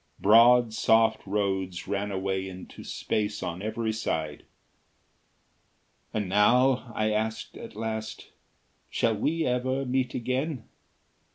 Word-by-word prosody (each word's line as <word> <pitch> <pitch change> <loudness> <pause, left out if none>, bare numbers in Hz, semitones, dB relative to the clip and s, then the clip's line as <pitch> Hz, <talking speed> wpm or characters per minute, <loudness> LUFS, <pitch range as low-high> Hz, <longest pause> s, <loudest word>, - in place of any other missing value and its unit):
Broad, 115 +2 +6
soft 110 0 +3
roads 95 -3 -2
ran 100 0 -2
away 95 0 -2
into 95 0 -10
space 105 0 -2
on 85 +2 -4
every 110 +1 -2
side. 80 -8 -3 1.7
"And 105 -3 -2
now 125 +6 +3
..." - - -16
I 110 0 +1
asked, 110 +1 -2
at - - -10
last, 110 0 -5 0.6
"shall 115 -1 +1
we 160 +10 0
ever 130 +2 0
meet 130 0 -1
again?" 130 +2 -2
110 Hz, 115 wpm, -27 LUFS, 100-125 Hz, 1.7 s, Broad